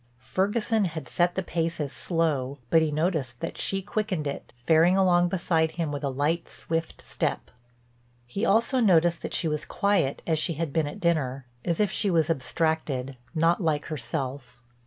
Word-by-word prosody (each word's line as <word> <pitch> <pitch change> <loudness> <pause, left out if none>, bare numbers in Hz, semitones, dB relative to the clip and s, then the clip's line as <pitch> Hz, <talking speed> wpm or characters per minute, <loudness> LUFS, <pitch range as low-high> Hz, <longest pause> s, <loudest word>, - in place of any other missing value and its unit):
Ferguson 205 - 0
had 160 -3 -5
set 175 0 +1
the 190 - -1
pace 165 -1 -2
as 145 -2 -3
slow, 145 -6 0
but 165 - +6
he 160 - +1
noticed 150 -6 -1
that - - -4
she 195 0 0
quickened 200 -6 -2
it, 140 - -5
faring 160 +8 +4
along 175 -2 +4
beside 165 -3 +1
him 165 -3 -2
with 145 -1 -4
a 140 - 0
light, 145 +6 -1
swift 165 0 -4
step. - - -2 0.7
He 160 - -4
also 235 +4 +3
noticed 175 -6 +4
that - - -4
she 170 - 0
was 150 -1 -1
quiet, 195 -9 0
as 160 -2 +1
she 165 - 0
had 155 -2 -3
been 160 -2 +1
at 145 - -7
dinner; 140 -6 0 0.2
as 170 -2 -1
if 205 -2 +2
she 205 - +1
was 165 -2 +3
abstracted, 140 -2 -1 0.2
not 165 +4 +3
like 155 -3 0
herself. 135 -1 -4
165 Hz, 180 wpm, -27 LUFS, 145-180 Hz, 0.7 s, but